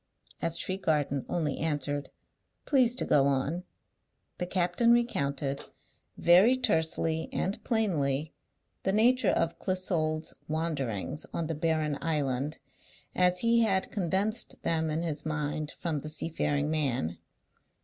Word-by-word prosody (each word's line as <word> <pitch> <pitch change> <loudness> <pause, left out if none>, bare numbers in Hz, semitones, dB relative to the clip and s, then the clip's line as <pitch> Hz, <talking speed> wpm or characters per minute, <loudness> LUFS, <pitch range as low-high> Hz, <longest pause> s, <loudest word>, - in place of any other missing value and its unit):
As 165 0 0
Tregarthen 150 -8 0
only 155 -5 -1
answered, 145 -2 -1 0.6
"Please 255 -4 +3
to - - -1
go 140 -1 +4
on," 140 +6 -1 0.7
the 180 - -2
captain 180 +6 +2
recounted, 140 - 0 0.5
very 190 +9 +6
tersely 160 -7 0
and 195 +3 -2
plainly, 155 - 0 0.5
the 190 - 0
nature 245 +4 +4
of 165 - 0
Clissold's 165 -4 -1
wanderings 150 - -3
on 170 - -1
the 165 - -2
barren 155 -2 0
island, 145 -2 -1 0.6
as 180 0 +3
he 235 0 +4
had 195 -5 +1
condensed 200 +4 0
them 160 -1 +1
in 155 +2 -1
his 150 -3 -3
mind 150 -1 -2
from 165 -4 -2
the 155 - -7
seafaring 150 -2 -1
man. 120 - 0
160 Hz, 120 wpm, -29 LUFS, 145-185 Hz, 0.7 s, very